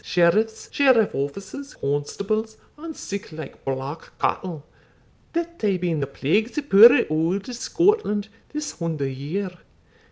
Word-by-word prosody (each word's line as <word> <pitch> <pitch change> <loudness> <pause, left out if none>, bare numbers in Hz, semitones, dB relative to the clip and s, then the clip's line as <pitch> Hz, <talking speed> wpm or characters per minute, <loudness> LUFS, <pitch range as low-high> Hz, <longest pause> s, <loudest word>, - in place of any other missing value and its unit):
sheriffs, 210 +6 +2
sheriff 255 -7 +4
officers, 195 - -5
constables, 200 +10 -2 0.2
and 320 +1 -8
sic 200 -3 -6
like 155 -2 -9
black 135 +4 -4
cattle, 165 -6 -2 0.7
that 340 0 -3
hae 200 -4 +2
been 175 -3 -1
the 140 - -1
plagues 205 - 0
o' - - +2
puir 230 -2 +8
auld 165 +6 0
Scotland 260 - +1 0.2
this 300 0 -3
hunder 160 -5 -1
year. 150 +9 -3
195 Hz, 125 wpm, -24 LUFS, 155-235 Hz, 0.7 s, puir